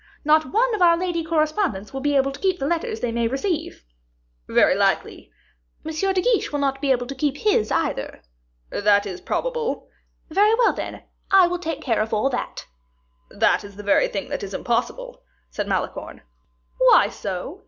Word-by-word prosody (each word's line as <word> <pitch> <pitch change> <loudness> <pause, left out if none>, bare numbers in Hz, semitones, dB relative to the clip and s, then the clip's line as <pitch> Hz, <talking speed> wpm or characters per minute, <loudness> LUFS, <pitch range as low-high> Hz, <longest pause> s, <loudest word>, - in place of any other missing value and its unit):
Not 310 +1 +3
one 475 +3 +2
of 425 - -2
our 340 -1 +6
lady 345 -2 -2
correspondents 310 - -1
will 270 - -3
be 290 +1 +1
able 275 0 +2
to 275 - -10
keep 375 -2 +1
the 275 - -3
letters 325 -8 -2
they 245 - -1
may 235 0 0
receive." 300 - -3 0.6
"Very - - +4
likely." - - -1 0.5
"M. 320 - -3
de 380 +3 +1
Guiche 480 -2 +1
will 290 - -1
not 275 -1 -1
be 285 - -1
able 245 -1 +1
to 270 - -6
keep 285 +1 -1
his 345 - +1
either." - - -2 0.5
"That 205 0 +3
is 185 -3 -6
probable." 485 -1 -3 0.4
"Very 415 +6 +4
well, 475 -1 +3
then; - - -6 0.3
I 385 -2 +7
will 350 0 -2
take 325 -4 -4
care 230 -5 +1
of 220 0 -1
all 240 +6 +1
that." 245 - -4 0.6
"That - - +2
is 200 -1 -11
the 205 - -9
very 205 - +3
thing - - -5
that - - -3
is - - -6
impossible," - - -2 0.3
said 205 - -3
Malicorne. 190 -2 -3 0.6
"Why - - +6
so?" - - -6
305 Hz, 185 wpm, -23 LUFS, 245-380 Hz, 0.6 s, I